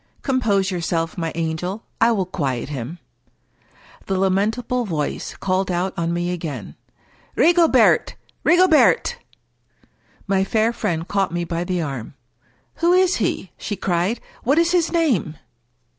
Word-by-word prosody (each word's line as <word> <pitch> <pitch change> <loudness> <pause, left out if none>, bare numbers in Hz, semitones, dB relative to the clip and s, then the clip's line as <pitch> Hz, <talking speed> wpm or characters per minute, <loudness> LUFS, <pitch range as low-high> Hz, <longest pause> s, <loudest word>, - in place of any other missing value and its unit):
" - - -36
Compose 210 -8 +1
yourself, 165 -2 -2
my 165 -2 -3
angel. 170 +5 -3 0.2
I 230 +1 +5
will 200 -5 0
quiet 140 -9 -3
him." 140 +3 -5 1.1
The 190 - 0
lamentable 215 +6 0
voice 155 -9 -3
called 190 0 -1
out 180 +1 -1
on 170 0 -1
me 175 +1 -1
again, 145 - -5 0.3
" - - -33
Rigo 340 0 +5
bert - - +4 0.3
I - - +1
Rigobert! 365 +6 +4 0.5
" - - -35
My 190 - +3
fair 220 +3 +1
friend 165 -6 -2
caught 195 -3 0
me 175 0 -2
by 170 0 -3
the 180 -1 -1
arm. 135 -3 -6 0.3
" - - -39
Who 340 +1 +3
is 370 0 +3
he? 190 -4 -2
" - - -45
she 205 - -3
cried. 185 +5 0
" - - -26
What 275 +5 +2
is 335 0 +3
his 350 -2 +2
name 255 - +1
190 Hz, 160 wpm, -21 LUFS, 165-235 Hz, 1.1 s, I